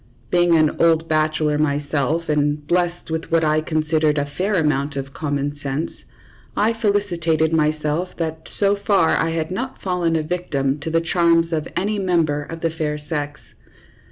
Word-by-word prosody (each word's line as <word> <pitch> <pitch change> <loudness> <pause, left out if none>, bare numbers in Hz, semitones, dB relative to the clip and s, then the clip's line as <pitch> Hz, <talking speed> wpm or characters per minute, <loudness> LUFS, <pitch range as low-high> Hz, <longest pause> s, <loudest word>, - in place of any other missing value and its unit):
Being 175 -1 +4
an 155 -2 +2
old 165 -1 +3
bachelor 155 -1 +1
myself, 145 +2 0
and 150 0 0
blessed 175 0 -1
with 160 0 -2
what 165 0 +3
I 155 0 +2
considered 155 -1 +1
a 145 - +1
fair 185 +9 -2
amount 145 -3 +1
of 135 0 -5
common 145 -1 -2
sense, 145 +3 -2 0.7
I 220 +2 +3
felicitated 175 -7 +1
myself 155 +2 +1
that 160 -1 -4
so 200 0 +3
far 200 -5 +2
I 165 - +2
had 165 0 -2
not 255 +7 -4
fallen 180 -3 0
a 160 - +1
victim 150 -5 -1
to 145 - -4
the 165 +1 +2
charms 170 0 +2
of 155 0 -1
any 205 +3 0
member 165 -6 +1
of 165 +3 -8
the 165 - 0
fair 155 -2 -2
sex. 150 -1 -4
160 Hz, 165 wpm, -21 LUFS, 150-170 Hz, 0.7 s, Being